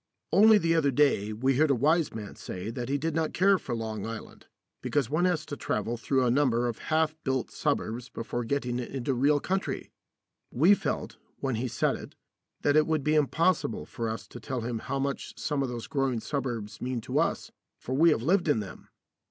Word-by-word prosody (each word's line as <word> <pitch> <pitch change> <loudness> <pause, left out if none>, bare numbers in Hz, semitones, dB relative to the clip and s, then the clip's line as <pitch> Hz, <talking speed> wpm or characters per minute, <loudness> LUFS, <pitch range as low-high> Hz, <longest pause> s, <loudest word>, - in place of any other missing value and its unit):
Only 210 +5 +7
the 165 -4 +2
other 160 -4 +3
day 135 -7 +2
we 130 +4 +1
heard 155 +1 +4
a 140 - +4
wise 155 +5 +2
man 105 -2 -7
say 95 +5 -6
that 125 0 -5
he 140 - +1
did 160 +3 -2
not 160 0 -1
care 195 +1 +4
for 120 - -4
Long 110 -3 -4
Island, 115 -1 -8 0.3
because 140 -5 0
one 165 +4 +2
has 165 -4 +1
to 145 - -5
travel 115 -3 -2
through 130 +2 +1
a 120 - +3
number 120 -3 +2
of 120 - -4
half 155 0 +2
built 130 -3 -1
suburbs 115 +3 -2
before 120 +1 -4
getting 125 0 -1
into 130 +2 -2
real 145 +4 +3
country. 190 +6 -2 0.6
We 165 +11 +5
felt, - - -2 0.2
when 135 -1 -2
he 115 +3 -1
said - - 0
it, - - -11 0.5
that 145 - +2
it 155 0 +5
would 155 -3 0
be 150 +2 +2
impossible 155 -2 +1
for 115 -1 -4
us 110 - -5
to - - -9
tell 130 -3 -4
him 115 0 -3
how 140 +4 -3
much 140 0 -3
some 145 -3 -1
of 135 - -1
those 120 -2 -5
growing 135 -5 0
suburbs 120 -6 -4
mean 125 -1 -2
to - - -1
us, - - -1 0.3
for 130 - -5
we 160 +5 +5
have 120 -7 +1
lived 175 +4 +2
in 145 -7 +3
them. 100 -3 -8
135 Hz, 210 wpm, -28 LUFS, 120-155 Hz, 0.6 s, Only